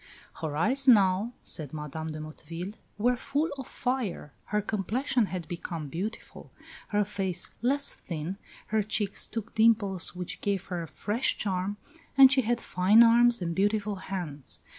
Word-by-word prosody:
"Her 150 -2 -3
eyes 260 - +4
now" 200 -1 +5
says 155 -5 -2
Madame 155 +1 -5
de 155 - -6
Motteville, 165 +5 -7 0.2
"were 245 +4 +2
full 285 +6 -1
of 265 - -6
fire, 245 - -3
her 210 - 0
complexion 220 +4 0
had 180 -3 -5
become 165 -3 -5
beautiful, 195 +9 -6 0.4
her 210 -1 +1
face 190 -3 -2
less 280 +4 +1
thin, 170 +2 -5 0.3
her 220 0 +2
cheeks 210 0 0
took 225 -1 -6
dimples 215 -6 +2
which 180 -1 -6
gave 195 -2 -1
her 175 - -2
a 165 - -6
fresh 215 - -1
charm, 195 0 -2 0.4
and 265 -1 +9
she 270 -1 +5
had 240 0 0
fine 205 +5 +5
arms 235 -2 +5
and 170 -1 -2
beautiful 205 +2 0
hands. 175 -8 -3
200 Hz, 155 wpm, -28 LUFS, 175-230 Hz, 0.4 s, and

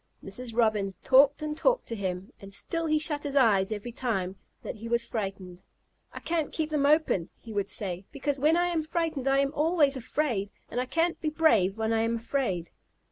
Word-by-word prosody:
Mrs. 230 +4 -5
Robin 215 -4 +2
talked 275 +3 +5
and 300 0 -3
talked - - +2
to 230 - -3
him, 190 -2 -4
and 195 0 -10
still 330 -1 -1
he 310 0 +3
shut 300 -1 +1
his 285 -1 -4
eyes 215 -7 +4
every 215 +3 -4
time 195 -7 -2 0.3
that - - -6
he 225 +2 -7
was 235 0 +1
frightened. 195 -4 -5 0.5
"I - - -8
can't 325 -3 -1
keep 315 -1 -2
them 285 -2 +2
open," 300 - +2
he 225 - -10
would 200 -1 -1
say, 185 -2 -3
"because 285 -1 -2
when 310 +4 +4
I 350 0 +2
am 335 -2 0
frightened 310 -4 -2
I 270 0 +4
am 275 +1 +1
always 305 -2 +3
afraid, 250 -5 -1 0.2
and 245 - -1
I 255 - -4
can't 335 +4 0
be 310 - 0
brave 230 - +3
when 220 0 0
I 225 - +2
am 230 +1 0
afraid." 230 -8 -2
255 Hz, 205 wpm, -28 LUFS, 205-305 Hz, 0.5 s, talked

